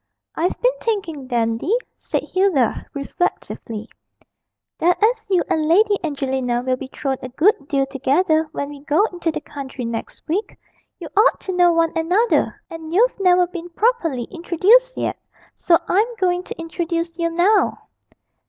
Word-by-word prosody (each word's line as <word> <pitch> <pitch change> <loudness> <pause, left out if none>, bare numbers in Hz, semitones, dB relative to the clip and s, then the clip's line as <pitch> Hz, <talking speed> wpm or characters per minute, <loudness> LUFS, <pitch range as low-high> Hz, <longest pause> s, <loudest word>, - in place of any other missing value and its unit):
'I've 345 +3 -1
been - - +3
thinking, 340 - -3
Dandy,' 235 - 0 0.2
said - - -2
Hilda, 370 - +1
reflectively, 275 -6 -3 0.9
'that 350 +2 +3
as 445 0 +2
you 370 -3 +3
and 310 -1 0
Lady 410 +5 +4
Angelina 265 -5 -1
will 255 0 +1
be 260 +1 -8
thrown 270 -2 -2
a 255 - -6
good 300 - +2
deal 275 -2 +1
together 310 +4 +1
when 285 - -4
we 290 -1 -9
go 315 +7 +3
into 350 -1 -2
the - - -5
country 270 -4 -7
next 230 -1 -6
week, 380 +8 -2 0.4
you 340 - -7
ought 425 +4 +4
to 375 - -4
know 355 -1 +5
one 330 -1 +2
another, 360 +9 +1
and 320 -1 -8
you've 445 +6 +2
never 360 -2 +4
been 350 -1 -8
properly 340 - 0
introduced 405 +9 +3
yet; - - -2 0.3
so 335 - +3
I'm 445 +6 +1
going 360 -3 +1
to - - -8
introduce 335 0 -3
you 335 0 +1
now.' 355 +6 +2
335 Hz, 155 wpm, -21 LUFS, 280-380 Hz, 0.9 s, know